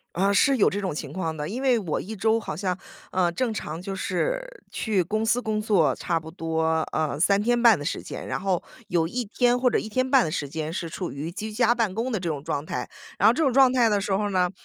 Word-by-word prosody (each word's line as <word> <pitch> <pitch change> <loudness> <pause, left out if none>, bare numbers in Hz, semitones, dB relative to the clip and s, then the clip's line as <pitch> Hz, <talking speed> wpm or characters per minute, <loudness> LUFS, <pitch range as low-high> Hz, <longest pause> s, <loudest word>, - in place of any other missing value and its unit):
呃， 195 +3 +2
是 275 +7 +4
有 215 - +4
这 200 - -2
种 190 -2 -2
情 - - -6
况 165 -4 -3
的。 150 0 -4
因 245 +5 -4
为 255 -3 +3
我 180 -8 -2
一 220 +4 -7
周 220 +2 +2
好 175 - -5
像， 185 0 -1 0.4
呃， 180 -2 +2
正 225 +7 -1
常 160 -5 -5
就 195 +2 -5
是 - - -1 0.3
去 210 -5 0
公 215 +5 -1
司 235 +2 +2
工 215 -3 -1
作 180 - +3
差 170 -2 -1
不 160 0 -11
多， 160 -1 0
呃， 155 -2 -1
3 200 +4 +4
天 240 +3 +2
半 235 -4 +6
的 145 - -6
时 155 - -3
间。 - - -7
然 - - -3
后 185 -2 0 0.3
有 170 -2 +1
1 245 +8 -3
天 245 +3 +2
或 250 0 +3
者 - - +2
1 220 - -4
天 255 +4 0
半 270 -3 +5
的 - - -2
时 145 -2 -3
间 155 +2 -4
是 170 -1 -3
处 175 +2 -5
于 145 +4 -5
居 215 +4 -6
家 235 +1 +3
办 230 -5 0
公 235 +4 -2
的 220 - 0
这 175 -2 -3
种 145 -3 -3
状 145 0 -3
态。 125 -4 -4 0.3
然 205 - +6
后 - - +6
这 290 - -3
种 270 -5 +3
状 265 -1 +6
态 245 -3 +4
的 205 -2 +2
时 200 - -4
候 205 +2 0
呢， 180 -2 +2
200 Hz, 275 characters per minute, -25 LUFS, 165-230 Hz, 0.4 s, 半